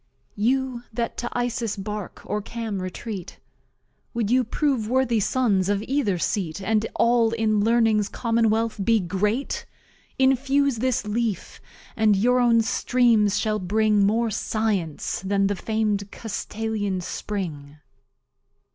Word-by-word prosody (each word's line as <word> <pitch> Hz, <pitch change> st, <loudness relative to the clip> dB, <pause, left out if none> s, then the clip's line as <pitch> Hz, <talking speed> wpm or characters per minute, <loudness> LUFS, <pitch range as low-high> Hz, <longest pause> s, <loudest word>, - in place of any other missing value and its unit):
You 250 Hz, +3 st, 0 dB
that 230 Hz, +1 st, -3 dB
to 240 Hz, -, -3 dB
Isis's 240 Hz, -3 st, -1 dB
Bark 210 Hz, 0 st, -6 dB
or 210 Hz, -, -2 dB
Cam 220 Hz, -3 st, -4 dB
retreat, 185 Hz, +1 st, -6 dB, 0.8 s
Wou'd 225 Hz, -2 st, 0 dB
you 255 Hz, +1 st, +4 dB
prove 245 Hz, -2 st, -1 dB
worthy 250 Hz, -3 st, +2 dB
Sons 200 Hz, -4 st, +1 dB
of 205 Hz, 0 st, 0 dB
either 250 Hz, -9 st, 0 dB
Seat, 170 Hz, -1 st, -2 dB
And 220 Hz, +2 st, 0 dB
All 235 Hz, -1 st, +3 dB
in 220 Hz, -2 st, +1 dB
Learning's 225 Hz, -2 st, +3 dB
Commonwealth 230 Hz, -1 st, 0 dB
be 225 Hz, +2 st, +3 dB
Great? 205 Hz, +8 st, -1 dB, 0.5 s
Infuse 270 Hz, 0 st, +2 dB
this 250 Hz, -1 st, 0 dB
Leaf, 220 Hz, -1 st, -2 dB, 0.3 s
and 215 Hz, -2 st, +4 dB
your 245 Hz, +6 st, +3 dB
own 235 Hz, -2 st, +4 dB
Streams 230 Hz, -3 st, +2 dB
shall 215 Hz, -1 st, 0 dB
bring 210 Hz, +2 st, +2 dB
More 225 Hz, +3 st, +2 dB
Science 200 Hz, -8 st, -1 dB
than 195 Hz, +1 st, +1 dB
the 200 Hz, +1 st, +1 dB
fam'd 210 Hz, 0 st, -1 dB
Castalian 215 Hz, -3 st, -3 dB
Spring. 155 Hz, -9 st, -5 dB
220 Hz, 125 wpm, -24 LUFS, 205-235 Hz, 0.8 s, you